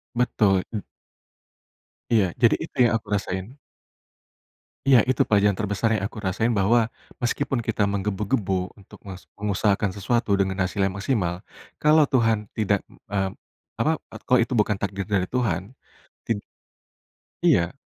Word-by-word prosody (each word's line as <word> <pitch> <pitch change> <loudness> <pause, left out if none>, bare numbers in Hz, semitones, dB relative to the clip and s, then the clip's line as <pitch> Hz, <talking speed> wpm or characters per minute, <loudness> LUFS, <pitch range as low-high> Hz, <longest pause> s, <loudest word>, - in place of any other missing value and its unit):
Betul, 105 -6 +2
itu 105 -3 -4 1.3
Iya, 105 -4 +5 0.2
jadi 115 - +6
itu - - -10
yang 120 - +3
aku 110 - -15
rasain. 95 +6 -4 1.3
Iya 130 -3 +7
Itu 130 - +2
pelajaran 100 -2 +3
terbesar 105 +1 -1
yang 100 - -2
aku 110 - -7
rasain 100 +4 0
bahwa, 110 +3 +2 0.3
meskipun 135 +2 0
kita 105 - 0
menggebu-gebu 100 -1 -1
untuk 100 - -16
mes 95 -2 -8 0.2
mengusahakan 100 0 +1
sesuatu 105 0 +1
dengan 95 -1 0
hasil 95 +2 -1
yang 95 - -1
maksimal, 95 -5 -1 0.4
kalau 155 0 +5
Tuhan 115 -6 +1
tidak, 100 -2 0
m - - -21
mmm, 95 -1 0 0.5
apa 115 +8 +2 0.2
e - - -9
kalau 125 -1 +4
itu 120 +2 -1
bukan 105 0 +3
takdir 100 -1 -3
dari 100 -3 +1
Tuhan, 110 -3 -1 0.5
tin 105 -3 -1 1.0
Iya. 85 +10 +3
105 Hz, 140 wpm, -24 LUFS, 95-115 Hz, 1.3 s, Iya